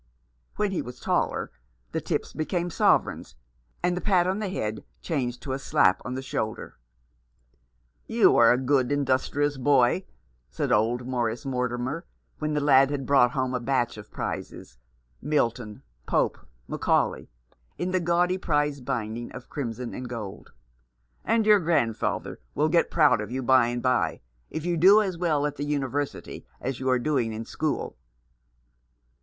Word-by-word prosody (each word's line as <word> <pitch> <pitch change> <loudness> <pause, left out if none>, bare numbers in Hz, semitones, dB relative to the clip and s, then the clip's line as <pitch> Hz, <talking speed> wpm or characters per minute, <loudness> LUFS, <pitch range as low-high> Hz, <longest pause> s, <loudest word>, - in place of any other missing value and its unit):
When 210 -1 0
he 185 - -1
was 125 0 -9
taller - - -1 0.4
the - - -2
tips - - -3
became 175 +2 -2
sovereigns, 65 - +1 0.5
and 175 0 +2
the 180 - -3
pat 185 -4 +3
on 190 +3 0
the 210 -3 -2
head 110 - -3 0.2
changed 125 -6 -3
to 135 - -4
a 135 - -3
slap 95 -8 +3
on 125 - -4
the 130 - -4
shoulder. 110 - -4 1.3
"You - - +4
are 115 -1 +7
a 125 - +4
good, 130 0 +1
industrious 145 +1 0
boy," 135 +5 +3 0.4
said - - -2
old 115 +3 +2
Morris 120 -2 -2
Mortimer, 125 +4 -2 0.4
when 150 0 -1
the - - +2
lad 135 -1 +5
had 140 -2 -3
brought 125 -3 +4
home 130 -2 -1
a 125 - 0
batch 120 -1 0
of 105 -1 -11
prizes 60 - -6 0.2
— - - -40 0.2
Milton, 115 -4 -1 0.2
Pope, - - 0 0.2
Macaulay - - 0 0.3
— - - -40
in 180 +1 -2
the 185 - +2
gaudy 175 +2 +1
prize 145 -5 0
binding 115 -1 -4
of 125 - -10
crimson 125 -3 -4
and 125 -1 -6
gold; 110 -5 -7 0.7
"and 225 -1 +2
your 210 -1 +6
grandfather 155 - -1 0.2
will 155 +2 +2
get 170 +1 +3
proud 150 -9 +4
of 105 - -6
you 130 +2 -3
by 130 -1 +5
and 120 0 -3
by, 125 -2 +1 0.3
if 160 - -5
you 175 -1 0
do 195 +6 +7
as 195 -4 -1
well 155 -5 +1
at 150 - -3
the 145 - -3
University 145 -1 -3 0.2
as 130 0 -4
you 130 0 -1
are 130 - +4
doing 125 -4 0
at 115 +1 -5
school." 155 +5 -3
130 Hz, 165 wpm, -26 LUFS, 120-155 Hz, 1.3 s, are